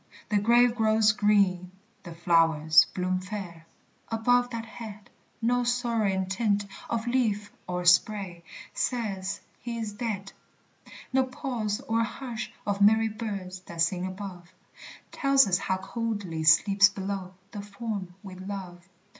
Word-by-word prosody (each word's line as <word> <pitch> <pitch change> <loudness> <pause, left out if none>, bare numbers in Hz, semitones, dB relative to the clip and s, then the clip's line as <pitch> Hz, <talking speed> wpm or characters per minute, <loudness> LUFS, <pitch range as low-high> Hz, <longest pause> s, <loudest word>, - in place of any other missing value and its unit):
The 210 -1 +3
grave 240 +3 +4
grows 220 -1 +4
green, 200 -4 +2 0.3
the 170 -3 -10
flowers 165 -2 +4
bloom 185 0 0
fair, 185 -4 -7 0.4
Above 245 +2 +2
that 230 -2 -5
head; 215 -3 -10 0.3
No 245 +1 +2
sorrowing 230 -6 0
tint 205 +1 0 0.2
of 230 -1 -1
leaf 220 -5 0 0.2
or 180 0 -3
spray 180 -1 +3 0.3
Says 200 -6 -2 0.2
he 235 -1 -5
is 220 -2 -4
dead. 205 -4 -4 0.8
No 265 0 +3
pause 245 -4 -3
or 230 -4 0
hush 235 -1 -5
of 200 -1 -1
merry 220 +2 +5
birds 200 -4 -5
That 170 -1 -5
sing 180 +2 +1
above 185 -2 -8 0.6
Tells 275 -2 +4
us 180 -1 +2
how 190 -1 -1
coldly 195 -5 -4
sleeps 195 +5 +6
below 195 -2 -5 0.2
The 205 - -6
form 200 -3 -6
we 195 -2 -9
love. 185 -1 -8
205 Hz, 130 wpm, -27 LUFS, 185-230 Hz, 0.8 s, sleeps